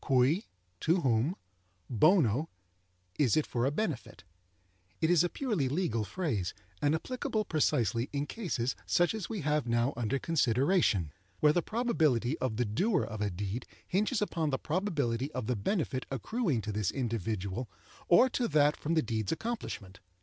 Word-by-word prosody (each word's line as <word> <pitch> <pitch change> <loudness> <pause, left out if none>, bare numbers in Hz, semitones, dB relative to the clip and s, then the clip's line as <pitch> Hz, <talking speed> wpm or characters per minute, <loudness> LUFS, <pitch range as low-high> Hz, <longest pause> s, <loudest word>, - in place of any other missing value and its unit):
Cui, 135 - +3 0.3
to 170 +3 +2
whom; 130 +5 +2 0.5
bono, 135 - +3 0.7
is 135 -4 +3
it 155 - +2
for 120 +1 0
a - - +1
benefit. 130 - -3 0.8
It 160 +1 +2
is 175 -1 +5
a 175 - +1
purely 205 - -1
legal 135 - 0
phrase, 110 - -2 0.3
and 145 +2 +3
applicable 220 +3 -2
precisely 125 - +1
in 145 0 -1
cases 145 - -2
such 175 +3 +3
as 210 -6 -4
we 215 -4 -3
have 150 -2 0
now 120 +3 +1
under 120 +3 0
consideration, 130 - +2 0.3
where 150 0 +5
the 175 - +2
probability 160 - +1
of 120 -5 -1
the 125 - +1
doer 180 - +1
of 110 -2 -5
a 105 - +1
deed 100 +6 -4 0.2
hinges 210 +4 +1
upon 165 -6 -1
the 135 - 0
probability 145 - -1
of 130 - -3
the 125 - 0
benefit 130 - -1
accruing 150 - -1
to 105 - -4
this 105 -2 0
individual 110 -3 -2 0.4
or 210 +9 +7
to 245 -1 -1
that 150 -5 +4
from 165 +3 -2
the 160 - +3
deed's 110 -3 -2
accomplishment. 160 - -4
140 Hz, 160 wpm, -31 LUFS, 115-175 Hz, 0.8 s, or